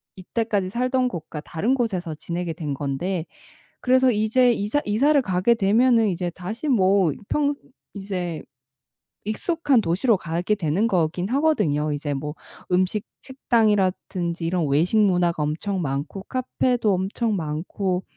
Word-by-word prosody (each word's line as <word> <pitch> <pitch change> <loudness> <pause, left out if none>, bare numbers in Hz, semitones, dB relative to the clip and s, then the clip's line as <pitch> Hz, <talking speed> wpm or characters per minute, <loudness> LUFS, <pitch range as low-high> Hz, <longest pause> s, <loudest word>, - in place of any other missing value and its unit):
이때까지 200 0 -2
살던 255 +3 +1
곳과 160 -6 -6
다른 205 +12 -1
곳에서 185 -10 -2
지내게 170 +2 -4
된 150 -3 -4
건데 155 +6 -2 0.6
그래서 255 0 +4
이제 235 +3 +3
이사 210 +8 0
이사를 275 +8 +3
가게 190 -1 +1
되면은 230 +2 +3
이제 180 -1 -2
다시 190 - -6
뭐 195 - +3 0.2
평 290 -1 +1 0.4
이제 185 -5 -4 0.8
익숙한 280 - +1
도시로 200 +5 +2
가게 175 +4 -1
되는 190 +3 0
거긴 180 0 0
하거든요. 210 - +1
이제 145 0 -3
뭐 150 +2 -4 0.4
음식 185 +4 +1 0.2
식당이라든지 195 -8 0
이런 170 -2 0
외식 160 +10 +2
문화가 180 -5 +2
엄청 180 +6 -2
많고 145 +6 -3
카페도 245 -2 0
엄청 200 +4 -1
많고 180 +4 -2
190 Hz, 285 characters per minute, -23 LUFS, 170-230 Hz, 0.8 s, 그래서